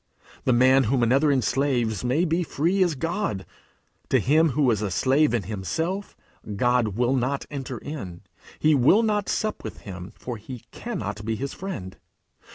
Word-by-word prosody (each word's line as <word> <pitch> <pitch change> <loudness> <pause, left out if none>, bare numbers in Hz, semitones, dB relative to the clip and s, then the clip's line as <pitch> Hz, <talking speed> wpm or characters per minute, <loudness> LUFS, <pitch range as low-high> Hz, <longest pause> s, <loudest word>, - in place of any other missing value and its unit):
The - - +3
man 130 +2 +5
whom 125 +2 +2
another 135 +6 +3
enslaves 130 -4 +1
may 135 +8 +2
be 165 +1 +1
free 175 +4 0
as 175 -4 +3
God; 165 - -2 0.6
to - - +4
him 155 +4 +4
who 140 -5 +4
is 105 -2 0
a 105 - -1
slave 135 - +3
in 120 -4 0
himself, 160 - -3 0.4
God 120 -2 +1
will 125 +2 +2
not 135 +2 -1
enter 135 -3 -5
in; 100 - -7 0.4
he 155 0 +3
will 145 - +5
not 210 -2 0
sup 215 0 -1
with 110 - -7
him, 90 -1 -8
for 125 -2 -6
he 120 +3 -9
cannot 205 - -5
be 110 +1 -1
his 135 +5 -4
friend. 100 - -6
130 Hz, 165 wpm, -25 LUFS, 115-155 Hz, 0.6 s, man